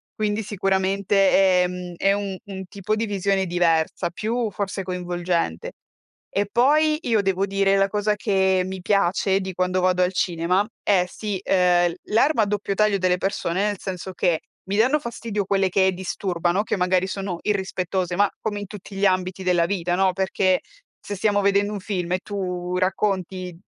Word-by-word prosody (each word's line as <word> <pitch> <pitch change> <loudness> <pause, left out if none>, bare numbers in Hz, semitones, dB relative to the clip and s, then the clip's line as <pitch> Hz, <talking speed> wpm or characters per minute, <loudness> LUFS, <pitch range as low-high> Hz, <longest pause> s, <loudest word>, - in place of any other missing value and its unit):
quindi 215 0 -1
sicuramente, 195 -1 +2
ehm, 180 0 -4
è 195 0 +3
un 200 -2 -3
un 190 -1 -7
tipo 200 +3 -2
di 225 +1 -1
visione 195 -1 0
diversa, 170 -2 +1
più 225 +4 -2
forse 195 0 -4
coinvolgente. 175 - -2 0.6
E 200 0 -1
poi 305 +5 +3
io 225 -4 +2
devo 195 0 0
dire, 195 0 +2
la 195 0 +3
cosa 210 0 0
che 190 -3 +2
mi 190 -1 -6
piace 195 0 +2
di 190 0 -5
quando 185 +1 0
vado 180 0 +3
al 180 +1 0
cinema 180 +3 +1 0.2
è 185 -3 +3
sì, 205 0 -4
ehm, 175 -2 +3
l - - -9 0.2
l'arma 235 0 +4
a - - +1
doppio 205 -1 -2
taglio 210 -1 +3
delle 180 0 +2
persone, 195 0 -1
nel 205 -2 -2
senso 190 0 -6
che, 170 -2 +1 0.3
mi 200 - 0
danno 260 +7 +3
fastidio 230 -6 -4
quelle 195 -1 +2
che 190 0 +3
disturbano, 180 0 -1
che - - -1
magari 185 +1 +2
sono 190 -3 -4
irrispettose, 185 -3 -1
ma 205 +1 +3
come 205 -2 -3
in 200 - -6
tutti 205 -1 -10
gli 200 +1 +1
ambiti 185 0 0
della 175 -2 +3
vita, 175 -2 -1
no, 190 -1 +2
perché 190 -1 +1 0.4
se 205 - -6
stiamo 205 +1 +1
vedendo 200 +1 +2
un 205 - -4
film 180 -3 -3
e 185 - +1
tu 180 -3 -4
racconti 185 -2 -1
190 Hz, 175 wpm, -23 LUFS, 180-205 Hz, 0.6 s, l'arma